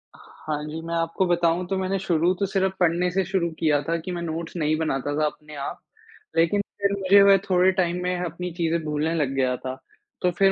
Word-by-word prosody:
हाँ 150 -1 -6
जी, 160 +2 -6
मैं 165 +1 -5
आपको 165 +3 0
बताऊँ 175 0 +2
तो 195 0 -1
मैंने 190 +1 -1
शुरू 175 -1 +2
तो 200 - +2
सिर्फ 190 0 0
पढ़ने 175 +1 +2
से 190 +1 +1
शुरू 175 -2 0
किया 150 -3 +2
था 165 0 -1
कि 165 +3 -6
मैं 175 -1 -4
नोट्स 165 0 -5
नहीं 155 -1 +1
बनाता 145 -2 -1
था 155 - +3
अपने 150 0 -6
आप। 140 -1 -5 0.6
लेकिन 170 +5 +3 0.2
फिर 200 0 +2
मुझे 195 +1 +6
वे 200 0 +7
थोड़े 185 +1 +4
टाइम 180 -1 0
में 180 0 0
अपनी 175 +2 -5
चीज़ें 165 0 +1
भूलने 155 +2 -1
लग 145 -4 0
गया 130 -1 +1
था, 130 0 -5 0.5
तो 180 - +2
फिर 195 +2 +3
170 Hz, 215 wpm, -24 LUFS, 155-185 Hz, 0.6 s, वे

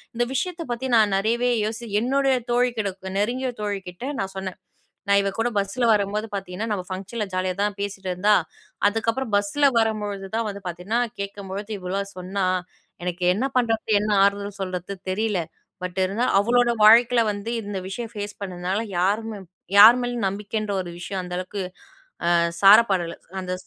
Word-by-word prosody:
இந்த 240 +1 +1
விஷயத்தை 340 +3 -2
பத்தி 250 +2 -2
நான் 215 -3 +4
நெறையவே 235 +5 +1
யோசி 225 +2 -4
என்னுடைய 270 +2 +2 0.2
தோழி 245 +1 +3
கிட்டக்க, 190 -2 -4
நெருங்கிய 250 +4 0
தோழி 205 -2 -2
கிட்ட 245 +11 -6
நான் 190 0 -3
சொன்னேன். 190 -1 -5 0.5
"நான் 200 0 +6
இவ 195 - 0
கூட 235 +2 +2
பஸ்ஸில 215 +5 -1
வரும்போது 210 +2 -1
பார்த்தீங்கன்னா, 195 +3 -4
நம்ம 185 -3 -4
ஃபங்ஷன்ல 195 +3 -4
ஜாலியா 185 0 -1
தான் 205 -1 -1
பேசிட்டிருந்தா. 195 0 +1 0.5
அதுக்கப்பறம் 225 +2 -2
பஸ்ஸில 245 +9 +2
வரும்பொழுது 210 -3 -1
தான் 230 -1 -1
வந்து 200 0 -8
பார்த்தீங்கன்னா, 180 +7 -1 0.2
கேட்கும் 200 -1 -7
பொழுது 205 +2 -5
இவ்ளோலாம் 195 +2 -4
சொன்னா. 185 +1 -2 0.6
எனக்கு 180 0 -3
என்ன 250 +6 0
பண்ணுறது, 225 -2 0
என்ன 215 - -2 0.2
ஆறுதல் 200 0 -2
சொல்றது 185 +1 -4 0.2
தெரியல. 210 -1 0 0.4
பட் 180 +1 -5
இருந்தாலும், 205 +7 0
அவளோட 240 +3 +3
வாழ்க்கையில 235 +2 +7
வந்து 205 +2 -5
இந்த 205 -1 -5
விஷயம் 225 +3 -5
ஃபேஸ் 205 -1 -5
பண்ணதுனால 185 +2 -2 0.2
யாருமே 210 +3 0 0.4
யார் 220 +4 +11
மேலயும் 245 -3 -2
நம்பிக்கைன்ற 205 +2 -3
ஒரு 175 - -7
விஷயம் 190 +1 -4
அந்த 180 0 -7
அளவுக்கு 185 +2 -4 0.7
அ - - +4 0.3
சார 200 +3 +10
பாடல". 175 -3 -1 0.2
அந்த 185 -1 -4
205 Hz, 160 wpm, -24 LUFS, 190-230 Hz, 0.7 s, யார்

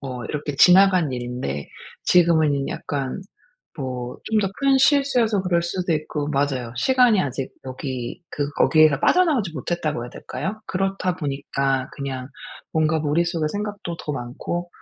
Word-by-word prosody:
어 125 -4 -6
이렇게 145 -1 -4
지나간 180 -2 +6
일인데 120 - -4 0.4
지금에는 160 -5 +3
약간 140 +4 -4 0.6
뭐 125 -3 -5
좀 220 - +1
더 195 - 0
큰 275 -1 +4
실수여서 255 -8 +3
그럴 175 -2 +1
수도 175 0 -1
있고 150 -1 -3
맞아요. 135 -5 -1
시간이 245 - +4
아직 135 -3 -3
여기 130 +1 -5
그 145 -1 -2
거기에서 155 -3 +5
빠져나오지 300 - +3
못했다고 155 -2 -2
해야 120 - -9
될까요? 215 +3 -5
그렇다 190 -1 -1
보니까 135 -3 -1
그냥 130 -2 -5 0.4
뭔가 160 0 +2
머릿속에 160 +2 0
생각도 205 -4 -4
더 150 - -4
많고, 145 +8 -4
155 Hz, 320 characters per minute, -23 LUFS, 135-185 Hz, 0.6 s, 지나간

